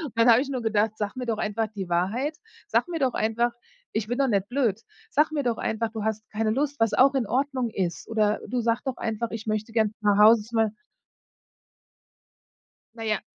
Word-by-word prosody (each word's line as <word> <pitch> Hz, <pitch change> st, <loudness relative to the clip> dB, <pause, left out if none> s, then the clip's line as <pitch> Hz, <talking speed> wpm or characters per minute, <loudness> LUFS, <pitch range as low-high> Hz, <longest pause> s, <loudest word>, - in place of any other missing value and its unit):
Dann 230 Hz, +1 st, +4 dB
habe 235 Hz, +2 st, +7 dB
ich 280 Hz, -, -4 dB
nur 255 Hz, -3 st, -3 dB
gedacht: 215 Hz, -1 st, +1 dB
„Sag 210 Hz, +3 st, -3 dB
mir 250 Hz, -1 st, -5 dB
doch 225 Hz, -2 st, 0 dB
einfach 215 Hz, +1 st, -1 dB
die 195 Hz, -4 st, -7 dB
Wahrheit. 220 Hz, -, 0 dB, 0.3 s
Sag -, -, +1 dB
mir 335 Hz, -2 st, -3 dB
doch 265 Hz, -3 st, +1 dB
einfach 235 Hz, +2 st, 0 dB, 0.4 s
ich 220 Hz, -1 st, -1 dB
bin 245 Hz, +2 st, -2 dB
doch 275 Hz, -1 st, +2 dB
nicht 200 Hz, -4 st, 0 dB
blöd. 240 Hz, -5 st, 0 dB, 0.3 s
Sag 300 Hz, +2 st, +3 dB
mir 295 Hz, -2 st, -1 dB
doch 240 Hz, -3 st, -1 dB
einfach, 220 Hz, 0 st, -1 dB
du 220 Hz, -2 st, -5 dB
hast 220 Hz, 0 st, -2 dB
keine 220 Hz, 0 st, 0 dB
Lust, 285 Hz, +4 st, -1 dB
was 225 Hz, -1 st, +2 dB
auch 270 Hz, +2 st, +5 dB
in 255 Hz, -5 st, 0 dB
Ordnung 260 Hz, -1 st, 0 dB
ist. 180 Hz, -6 st, -3 dB
Oder, 215 Hz, -2 st, +1 dB
du 250 Hz, -, -1 dB
sag 230 Hz, 0 st, +1 dB
doch 260 Hz, -2 st, -3 dB
einfach, 225 Hz, +1 st, -2 dB
ich 225 Hz, -1 st, -6 dB
möchte 215 Hz, +1 st, -2 dB
gern 220 Hz, -2 st, +1 dB
nach 205 Hz, -1 st, +3 dB
Hause, 220 Hz, +2 st, +7 dB
zu 230 Hz, +3 st, -9 dB
mein". 225 Hz, -1 st, +3 dB, 2.3 s
Naja. 220 Hz, -3 st, -2 dB
225 Hz, 205 wpm, -26 LUFS, 215-250 Hz, 2.3 s, habe